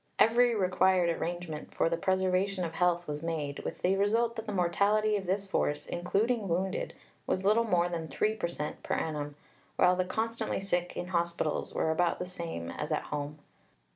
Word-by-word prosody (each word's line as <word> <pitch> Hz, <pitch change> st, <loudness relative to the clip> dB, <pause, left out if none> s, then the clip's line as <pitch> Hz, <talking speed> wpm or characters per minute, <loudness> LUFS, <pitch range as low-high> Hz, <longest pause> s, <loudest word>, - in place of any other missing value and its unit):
Every 235 Hz, +1 st, +5 dB
required 185 Hz, -2 st, +3 dB
arrangement 170 Hz, -3 st, -5 dB
for -, -, +3 dB
the 170 Hz, -, +1 dB
preservation 185 Hz, +1 st, +1 dB
of 165 Hz, -, -5 dB
health 175 Hz, 0 st, +1 dB
was 150 Hz, 0 st, -4 dB
made, 155 Hz, -4 st, -3 dB
with -, -, -6 dB
the 185 Hz, +2 st, +3 dB
result 225 Hz, +4 st, +2 dB
that 220 Hz, -1 st, -6 dB
the -, -, -2 dB
mortality 205 Hz, +4 st, +2 dB
of 195 Hz, -3 st, -3 dB
this 195 Hz, +2 st, 0 dB
force, 150 Hz, -6 st, 0 dB
including 205 Hz, +5 st, 0 dB
wounded, 185 Hz, +3 st, -1 dB, 0.3 s
was 185 Hz, -, 0 dB
little 220 Hz, +3 st, +4 dB
more 175 Hz, -5 st, +2 dB
than 165 Hz, -2 st, -3 dB
3 215 Hz, +6 st, +1 dB
per 215 Hz, -6 st, -2 dB
cent 150 Hz, -3 st, -5 dB
per -, -, -1 dB
annum, 145 Hz, -2 st, -3 dB, 0.4 s
while 180 Hz, -, +5 dB
the 185 Hz, -, +1 dB
'constantly 225 Hz, +5 st, -2 dB
sick' 180 Hz, -2 st, -1 dB
in 175 Hz, -, -4 dB
hospital 170 Hz, -3 st, 0 dB
were 160 Hz, -, +1 dB
about 170 Hz, +2 st, +2 dB
the 180 Hz, -, -3 dB
same 165 Hz, -, -5 dB
as -, -, -5 dB
at -, -, 0 dB
home. 145 Hz, +1 st, -3 dB
180 Hz, 185 wpm, -30 LUFS, 170-200 Hz, 0.4 s, Every